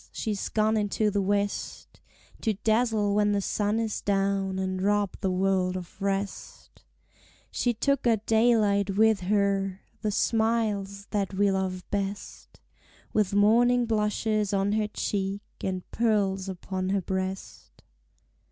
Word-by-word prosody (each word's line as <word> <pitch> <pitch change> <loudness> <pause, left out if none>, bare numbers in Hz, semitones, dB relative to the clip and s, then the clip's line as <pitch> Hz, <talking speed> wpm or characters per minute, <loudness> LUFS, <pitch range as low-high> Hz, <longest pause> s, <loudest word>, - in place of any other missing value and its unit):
she's 210 -3 -3
gone 215 0 +2
into 210 0 0
the 205 0 0
west, 200 +1 -2 0.4
To 220 -3 0
dazzle 220 -2 +2
when 205 0 +2
the 200 - +1
sun 205 +2 0
is 225 -2 -2
down, 195 -1 0
and 185 -1 -2
rob 205 0 +1
the 190 - 0
world 185 0 +1
of 180 +2 -10
rest; 195 0 -4 0.7
She 240 -2 0
took 275 +2 +1
our 230 -2 +4
daylight 210 -3 +2
with 220 -1 +4
her, 195 0 0 0.2
the 215 - 0
smiles 210 -2 0
that 200 -2 -1
we 200 0 +3
love 190 -1 -2
best, 200 0 -5 0.5
With 205 -2 +1
morning 240 +4 +4
blushes 215 -1 0
on 195 +1 +1
her 215 0 +1
cheek, 200 -1 -3 0.2
and 185 -1 -3
pearls 200 -4 +1
upon 185 0 -4
her 195 0 +1
breast. 190 +1 -5
200 Hz, 135 wpm, -27 LUFS, 195-215 Hz, 0.7 s, our